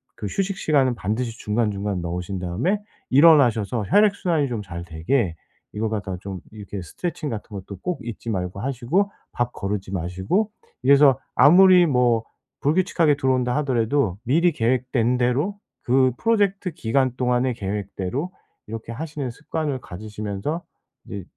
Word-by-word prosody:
그 105 - -5
휴식 195 - -2
시간은 135 -5 +2
반드시 115 +3 -2
중간중간 105 -3 -1
넣으신 90 +3 -4
다음에 100 - -1 0.3
일어나셔서 125 -8 +5
혈액 210 -1 +5
순환이 165 -8 0
좀 115 -3 -3
잘 85 -3 -7
되게 85 +3 0 0.4
이거 110 +1 -1
갖다가 100 -4 -3
좀 95 -2 -6
이렇게 105 -2 -7
스트레칭 155 - -4
같은 110 -2 -6
것도 100 0 -7
꼭 180 -5 -2
잊지 115 0 -6
말고 90 -1 -3
하시고 140 - 0 0.2
밥 120 0 -2
거르지 100 -1 -4
마시고 95 - -1 0.3
이래서 140 -2 +6 0.2
아무리 180 +3 +7
뭐 125 -5 +2 0.4
불규칙하게 160 -1 +2
들어온다 130 -3 +1
하더라도 125 -6 +1
미리 165 +8 +3
계획된 125 -1 +1
대로 135 +11 +1 0.3
그 130 +1 +3
프로젝트 200 -5 +1
기간 130 -3 0
동안의 125 0 +1
계획대로 100 - -3 0.4
이렇게 115 +1 -6
하시는 145 +1 -4
습관을 150 +1 -3
가지시면서 105 - -5 0.4
이제 100 -2 -6
125 Hz, 345 characters per minute, -23 LUFS, 105-150 Hz, 0.4 s, 아무리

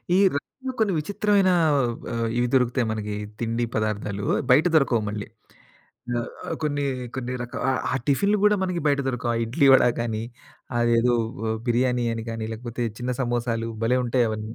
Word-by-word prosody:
ఈ - - +5 0.2
రైలు‌లో 260 - -5
కొన్ని 205 -4 +2
విచిత్రమైన 200 +3 +2 0.6
ఆహ్, 115 0 -1
ఇవి 125 - +2
దొరుకుతాయి 125 -1 +2
మనకి 105 -1 -3 0.2
తిండి 115 +1 -1
పదార్థాలు. 105 -2 -2 0.3
బయట 150 +6 +6
దొరకవు 130 -7 +3
మళ్ళీ. 105 0 -5 0.9
ఆహ్, 120 - -3 0.3
కొన్ని, 145 -1 0 0.3
కొన్ని 125 -1 -3
రకా 120 - -7
ఆహ్, 130 - 0
ఆ - - 0
టిఫిన్‌లు 200 +9 +2
కూడా 210 0 +5
మనకి 180 -2 -1
బయట 140 -1 +2
దొరకవు. 125 -2 -1
ఆ - - -1
ఇడ్లీ, 140 +6 +2
వడా 130 - +5
కానీ, 110 -2 -2 0.6
అదేదో 120 +1 +3 0.5
బిర్యానీ 125 0 +2
ఆహ్, 115 - 0
అని 115 -1 -5
కానీ, 115 -1 -4
లేకపోతే 120 +1 -4
చిన్న 125 +1 -3
సమోసాలు 120 -2 -1 0.2
భలే! 125 +2 +3
ఉంటాయి 120 0 +2
అవన్నీ. 110 +1 -5
120 Hz, 160 wpm, -24 LUFS, 115-140 Hz, 0.9 s, బయట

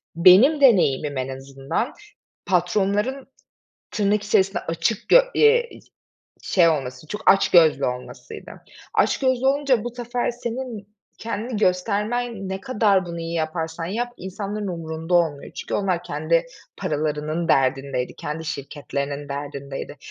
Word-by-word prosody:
benim 195 - +6
deneyimim 150 - +4
en 130 0 -2
azından 135 - -4 0.5
patronların 200 +8 0 0.6
tırnak 205 0 +1
içerisinde 195 -1 +2
açık 180 +6 -1
gö - - +8
eee, 475 +2 +4
i - - -13 0.6
şey 175 -3 +4
olması, 135 -3 -2
çok 210 +7 +2
açgözlü 165 -7 +4
olmasıydı. 125 0 -7 0.4
Açgözlü 260 -1 +2
olunca 270 -4 +2
bu 240 0 -5
sefer 245 0 -2
senin 240 -3 -6 0.3
kendini 230 +1 -4
göstermen 210 +3 -1
ne 190 0 -4
kadar 205 -4 +2
bunu 170 0 -6
iyi 165 0 -4
yaparsan 160 0 -3
yap 240 +6 -3
insanların 200 +3 -5
umurunda 165 0 -4
olmuyor. 160 -5 +1
Çünkü - - -5
onlar 185 -4 0
kendi 165 +1 0 0.3
paralarının 155 +2 -2
derdindeydi, 135 -1 +1
kendi 155 +2 -5
şirketlerinin 140 0 -5
derdindeydi. 140 0 -6
180 Hz, 120 wpm, -23 LUFS, 150-220 Hz, 0.6 s, gö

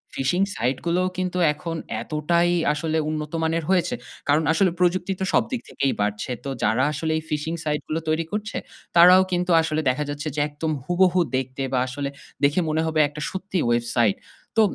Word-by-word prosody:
phishing 175 +9 +1
site 125 +3 0
গুলোও 180 +2 +1
কিন্তু 180 -1 -2 0.2
এখন 165 +2 -5 0.3
এতটাই 170 +3 +1 0.2
আসলে 160 +1 -1
উন্নত 150 -1 -3
মানের 165 +1 0
হয়েছে, 190 +6 +2 0.3
কারন 150 +2 +3
আসলে 185 0 +3
প্রযুক্তি 180 +1 +1
তো - - +1
সবদিক 255 - +1
থেকেই 135 - 0
বাড়ছে। 105 +4 -2
তো 140 - -4
যারা 110 +5 +2
আসলে 160 +2 -2
এই 160 - -4
phishing 155 +2 -2
সাইট 150 0 0
গুলো 160 +1 -1
তৈরি 155 +1 +1
করছে, 210 +1 -3 0.4
তারাও 180 +2 +8
কিন্তু 180 0 0
আসলে 155 -1 -1
দেখা 140 +4 0
যাচ্ছে 145 +1 -4
যে - - -1
একদম 155 +2 -3
হুবহু 180 0 +3 0.2
দেখতে, 130 +1 -4
বা 130 - +3
আসলে 140 +2 -3 0.3
দেখে 145 +5 +4
মনে 155 +1 +1
হবে 160 -1 0
একটা 150 +1 -9
সত্যি 190 0 -4
ওয়েবসাইট। 120 -3 +2 0.4
তো - - +7
155 Hz, 180 wpm, -24 LUFS, 145-180 Hz, 0.4 s, তারাও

